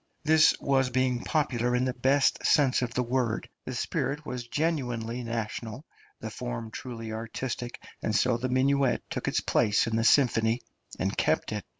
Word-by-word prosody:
This 155 +1 +5
was 135 -2 +2
being 125 -1 0
popular 125 -6 0
in 125 +1 +1
the 130 - -1
best 135 +3 +2
sense 135 -4 +3
of 125 -2 -2
the 125 - +1
word; 120 -2 -1 0.2
the - - -5
spirit 145 +2 -2
was 125 -3 -5
genuinely 125 -6 -2
national, 115 +3 -4 0.3
the 110 - -6
form 115 -1 -5
truly 115 -2 -6
artistic; 120 +2 -5 0.2
and 110 - -1
so 120 +4 +3
the 130 +2 -3
minuet 135 +1 +2
took - - -3
its - - +1
place 105 -1 +2
in 115 - -2
the 115 - +1
symphony, 115 -2 +3 0.4
and - - -1
kept - - +1
it. - - -3
125 Hz, 170 wpm, -28 LUFS, 115-130 Hz, 0.4 s, This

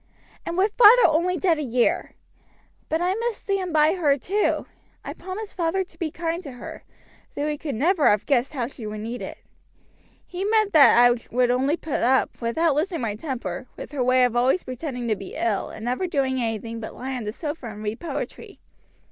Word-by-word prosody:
"And 340 - -3
with 400 +2 +2
father 480 +1 +8
only 345 +3 +2
dead 340 -5 +2
a - - -1
year! 250 -3 0 0.7
But 320 +2 0
I 360 +1 +1
must 460 +1 -3
stand 390 -3 -1
by 310 +1 +4
her, 300 -7 +2
too. 400 +9 0 0.4
I - - -5
promised 395 +3 -7
father 355 +2 0
to 370 - -20
be 335 -3 -1
kind 330 +2 -3
to 280 -7 -9
her, 245 - -9 0.5
though 290 - -1
he 300 - -1
could 290 -2 -5
never 315 - +3
have 205 0 +2
guessed 270 0 +1
how 255 -5 -1
she 235 -3 -8
would 210 0 -5
need 235 +3 -5
it. - - -7 0.9
He 365 +1 -5
meant 430 0 +2
that 290 -6 +7
I 245 0 +6 0.2
would 245 0 +2
only 270 +6 +1
put 310 -4 -3
up, 260 +2 +1
without 295 +8 +1
losing 330 +3 -1
my 220 -3 -1
temper, 255 +1 -5
with - - -8
her 280 -4 -1
way 255 +1 +4
of 245 -1 +1
always 255 +9 +2
pretending 255 -1 -5
to 220 - +1
be 195 -1 -9
ill, 215 -4 -1
and 220 - -8
never 255 +10 -1
doing 265 -5 0
anything 230 0 -3
but 220 - -7
lie 265 +1 -5
on 240 -4 -5
the 210 - -2
sofa 295 +1 -6
and 210 -1 -8
read 215 +2 -3
poetry. 345 - -6
280 Hz, 205 wpm, -24 LUFS, 240-345 Hz, 0.9 s, father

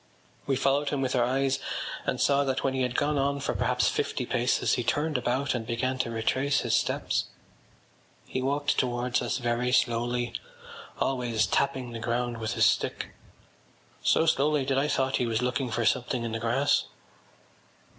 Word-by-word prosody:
We 135 - +2
followed 140 +2 +1
him 140 -2 -1
with 130 0 -1
our 125 - +3
eyes 135 +2 +1 0.5
and - - 0
saw 140 0 +3
that 135 -1 -1
when 135 - +1
he 130 - -1
had 125 -1 -1
gone 145 0 +1
on 140 +1 0
for 140 - -2
perhaps - - +1
fifty - - -1
paces 120 +1 +1
he 120 - 0
turned 150 +6 0
about 125 +3 0
and 120 -3 -2
began 125 +3 -2
to 120 - 0
retrace 130 +5 0
his - - +1
steps. - - 0 1.0
He 130 - -3
walked 145 +2 0
towards 125 0 0
us 120 - -1
very 120 0 0
slowly, 120 0 +1 0.7
always 120 -4 +1
tapping 130 0 0
the 115 - -6
ground 120 0 -2
with 110 -1 -2
his - - +3
stick, - - 0 0.9
so 160 - +3
slowly 150 -2 +2
that 135 0 +1
I 145 - +1
thought 135 -2 +1
he 125 - 0
was 115 +1 0
looking 125 +1 -1
for 120 0 -1
something 125 0 +1
in 115 - -3
the 115 - -2
grass. 120 +5 +2
125 Hz, 175 wpm, -28 LUFS, 120-135 Hz, 1.0 s, our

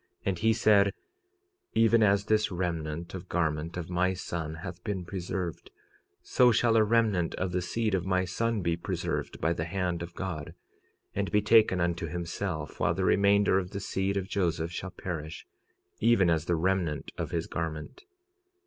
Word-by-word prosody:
And 95 -3 0
he 110 +1 +3
said—Even 115 - +1
as 100 -1 +3
this 110 0 +2
remnant 85 -2 -3
of 90 -1 -7
garment 80 0 -1
of 85 -2 -4
my 90 +1 +1
son 80 -3 -4
hath 90 0 -7
been 95 -4 -3
preserved, 90 -1 -4 0.5
so 125 -1 +4
shall 115 0 +3
a 110 - +6
remnant 105 -6 +2
of 95 0 -2
the 90 0 0
seed 110 +4 -1
of 95 -3 +1
my 95 0 +1
son 115 +4 -1
be 85 -1 +1
preserved 85 - -3
by 80 - +1
the 80 -1 -3
hand 90 -1 -2
of 85 0 -7
God, 85 -6 -5 0.6
and 100 0 -1
be 105 -1 +3
taken 110 -4 +5
unto 85 0 0
himself, 85 -1 -4
while - - +2
the - - 0
remainder 100 -1 +4
of 90 -1 -5
the 100 - -5
seed 95 0 -1
of 95 -1 -2
Joseph 85 -4 -1
shall 90 +1 -5
perish, 80 -4 -6 0.5
even 110 -6 +4
as 80 -1 +1
the 90 - +1
remnant 85 -3 -1
of - - -2
his 85 -1 -2
garment. 80 - -5
90 Hz, 170 wpm, -29 LUFS, 85-105 Hz, 0.6 s, a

